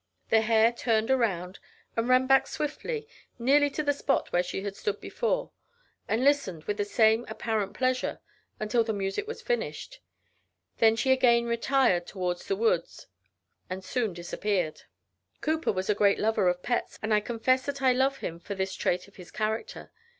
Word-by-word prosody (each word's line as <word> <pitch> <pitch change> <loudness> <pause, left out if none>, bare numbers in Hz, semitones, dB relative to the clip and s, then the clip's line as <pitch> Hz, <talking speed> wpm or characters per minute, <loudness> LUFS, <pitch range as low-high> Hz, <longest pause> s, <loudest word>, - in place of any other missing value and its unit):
The 225 - +5
hare 225 +1 +4
turned 225 0 +1
around, 195 -8 0 0.4
and 230 +2 0
ran 255 +1 +5
back 270 0 +4
swiftly, 440 +10 -4 0.3
nearly 285 +4 +4
to 305 +2 -3
the 290 -1 +2
spot 280 -1 -1
where 175 - +4
she 190 +2 -4
stood 200 +1 -3
before, - - -2 0.6
and 225 +3 0
listened 270 - +1
with 205 +3 -3
the 205 - 0
same 220 +2 +3
apparent 215 -4 -2
pleasure, 255 0 0 0.4
until 215 +2 +1
the 220 -1 -2
music 195 - -2
was 455 - -7
finished, - - -3 0.8
when 225 -1 +5
she 265 +4 +1
again 240 -2 +4
retired 235 -6 +2
toward 180 -2 -2
the 395 - -2
woods, 460 +4 0 0.6
and 185 +1 -5
soon 220 +1 -1
disappeared. 175 -1 -2 0.6
Cowper 315 +1 0
was 185 -1 -3
a 210 - +3
great 200 -1 +3
lover 215 -4 +2
of 180 0 -2
pets; 240 - -2
and 215 0 +1
I 210 - +5
confess 240 +4 +1
that 280 -1 -4
I 260 -1 +5
love 265 +2 +1
him 170 -8 -5
for 200 +3 -6
this 190 0 -2
trait 180 +1 -1
in 200 - -20
his 180 -4 -12
character. 220 - -4
225 Hz, 170 wpm, -28 LUFS, 200-265 Hz, 0.8 s, The